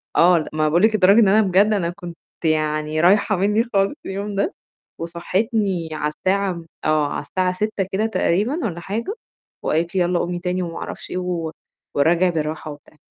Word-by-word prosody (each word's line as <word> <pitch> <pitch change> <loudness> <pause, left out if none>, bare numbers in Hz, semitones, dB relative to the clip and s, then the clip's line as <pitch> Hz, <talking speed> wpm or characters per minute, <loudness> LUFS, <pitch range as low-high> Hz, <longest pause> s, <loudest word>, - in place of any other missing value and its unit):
آه، 175 0 +6
لأ، 155 - -3
ما 155 - -4
أنا 155 - +3
باقول 170 +5 +2
لِك 220 0 +4
لدرجة 200 +3 +6
إن 210 - +6
أنا 215 +3 +5
بجد 195 0 +4
أنا 175 -4 0
كنت 175 -2 -9 0.3
يعني 155 0 0
رايحة 200 +3 +4
منّي 210 +5 +2
خالص 195 +3 +2
اليوم 200 +1 -4
ده، 200 - 0 0.5
وصحّتني 180 +1 -1
على 150 -1 -1
الساعة 195 0 0
م 170 -1 -9 0.2
آه، 155 -1 +2
على - - -3
الساعة 185 -1 0
06:00 210 +1 -1
كده 205 +3 0
تقريبًا 225 - 0
والّا 170 -4 -3
حاجة 225 - -4 0.5
وقالت 165 +4 0
لي: 185 - +3
"يالّا 175 0 +1
قومي 175 +1 -2
تاني" 180 +1 -2
وما 165 -1 -6
أعرفش - - -7
إيه - - -2
و 175 -3 -2 0.4
وأراجِع 170 +5 +3
بالراحة 155 -1 -3
وبتاع، 145 +1 -15
180 Hz, 190 wpm, -21 LUFS, 165-200 Hz, 0.5 s, آه